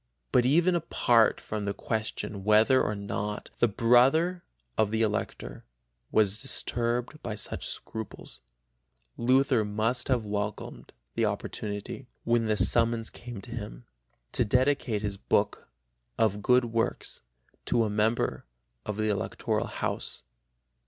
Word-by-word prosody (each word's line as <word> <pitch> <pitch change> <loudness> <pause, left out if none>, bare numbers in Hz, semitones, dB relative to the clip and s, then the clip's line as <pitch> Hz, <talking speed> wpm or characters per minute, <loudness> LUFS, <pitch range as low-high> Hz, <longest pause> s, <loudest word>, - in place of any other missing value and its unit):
But 125 0 +4
even 170 +6 +4
apart 120 -9 +3
from 105 -1 -4
the 100 - -2
question 105 -2 -3
whether 110 +5 +5
or 105 - -1
not 100 +1 -4
the 120 - +5
brother 130 - +3 0.3
of 110 - +2
the 110 +1 +1
Elector 110 0 -3 0.5
was 105 -1 +3
disturbed 120 +1 0
by 110 -3 -4
such 105 - -3
scruples, 110 -2 -7 0.7
Luther 130 -1 +3
must 110 +4 -1
have 125 -4 +1
welcomed 105 0 -4 0.2
the - - +1
opportunity, 105 +5 -4 0.2
when 115 -1 +2
the 110 -1 +1
summons 115 0 +3
came 120 -4 -9
to 120 - -11
him, 105 - -7 0.5
to 125 - +2
dedicate 125 -2 +1
his 100 -1 -2
book - - 0 0.5
Of 105 -2 +1
Good 125 +3 +4
Works 115 -1 -2 0.4
to 115 - +2
a 110 - 0
member 110 - 0 0.4
of 105 -1 -3
the 110 0 0
Electoral 100 - -1
house. - - -3
115 Hz, 130 wpm, -28 LUFS, 105-125 Hz, 0.7 s, whether